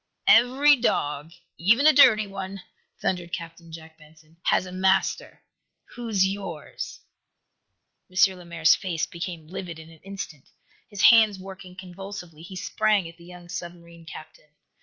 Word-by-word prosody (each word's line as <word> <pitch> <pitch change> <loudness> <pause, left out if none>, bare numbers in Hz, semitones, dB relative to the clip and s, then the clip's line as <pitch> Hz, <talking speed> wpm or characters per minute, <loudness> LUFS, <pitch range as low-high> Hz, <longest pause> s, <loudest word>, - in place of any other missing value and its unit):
"Every 265 +5 +5
dog, 150 - -1 0.3
even 230 - +3
a 310 - +7
dirty 225 -7 +6
one," 195 -1 -7 0.4
thundered 175 -2 -2
Captain 170 -1 -8
Jack 160 0 -12
Benson, 155 +1 -21
"has - - +2
a 185 - -9
master! 190 +1 0 0.5
Who's 225 -6 0
yours?" 190 -6 -6 1.1
M. 190 +1 +3
Lemaire's 170 -2 +2
face 170 -4 -2
became 170 -2 -7
livid 175 0 -7
in 160 0 -13
an 160 - -17
instant. 190 -7 -9 0.4
His 205 -4 -4
hands 220 -4 +6
working 190 -1 -11
convulsively, 185 -3 -10
he 180 +3 -10
sprang 210 0 0
at 165 0 -13
the 170 - -16
young 175 0 -13
submarine 170 -1 -9
captain. 155 -1 -12
180 Hz, 140 wpm, -25 LUFS, 165-195 Hz, 1.1 s, a